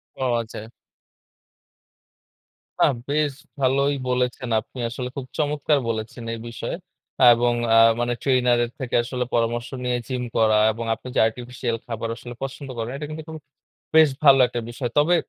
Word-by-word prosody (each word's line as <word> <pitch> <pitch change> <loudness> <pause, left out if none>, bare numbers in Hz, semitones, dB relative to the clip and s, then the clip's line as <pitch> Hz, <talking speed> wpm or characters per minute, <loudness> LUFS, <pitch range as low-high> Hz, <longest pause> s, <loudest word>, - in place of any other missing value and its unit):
ওহ, 130 -2 0
আচ্ছা। 110 -1 -8 2.1
না, - - +7 0.2
বেশ 150 -1 +1 0.3
ভালোই 140 +2 +2
বলেছেন। 125 0 -1
আপনি 130 - -13
আসলে 125 +1 -5
খুব 135 - -5
চমৎকার 150 -1 +1
বলেছেন 115 +1 -4
এই 115 - -5
বিষয়ে। 115 0 -5 0.6
এবং 120 +1 +2 0.2
আ - - +6 0.2
মানে 120 0 0
ট্রেইনারের 125 -3 +2
থেকে 130 -3 -3
আসলে 125 +1 -2
পরামর্শ 120 0 0
নিয়ে 125 -1 0
জিম 125 -2 -3
করা 110 -1 +4
এবং 115 +1 -5
আপনি 115 +3 -13
যে - - +3
আর্টিফিশিয়াল 120 0 -4
খাবার 115 -1 -4
আসলে 120 0 -9
পছন্দ 135 +1 -6
করে 115 0 -2
না, - - -5
এটা 150 +1 -5
কিন্তু 155 0 -6
খুবই 160 -1 -8 0.5
বেশ 160 -1 +7
ভালো 135 -2 +7
একটা 120 - -4
বিষয়। 120 +1 -4
তবে, 155 +4 +5
125 Hz, 155 wpm, -23 LUFS, 115-140 Hz, 2.1 s, না